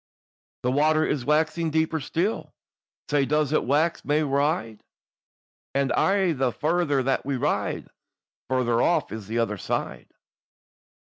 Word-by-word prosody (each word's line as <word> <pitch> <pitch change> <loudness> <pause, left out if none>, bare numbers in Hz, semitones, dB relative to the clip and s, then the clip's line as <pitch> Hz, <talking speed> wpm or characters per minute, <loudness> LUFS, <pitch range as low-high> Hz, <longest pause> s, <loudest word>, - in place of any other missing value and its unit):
"The 125 - +1
water 155 +3 +3
is 130 -5 -2
waxing 160 +2 +1
deeper 160 +1 0
still, 175 +9 -2 0.6
Sae 145 -1 +3
does 150 +1 +1
it - - +2
wax 155 +6 +1
mair 150 +1 +1
wide; 140 - 0 0.9
And 140 -1 +1
aye 195 -2 +2
the 130 -3 0
farther 155 -2 0
that 135 +1 0
we 140 0 -2
ride 125 - -1
on, - - -25 0.6
Farther 120 -2 +1
off 175 - +1
is 110 -3 -7
the 115 +2 -3
other 105 -4 -1
side. - - -4
145 Hz, 140 wpm, -25 LUFS, 130-160 Hz, 0.9 s, water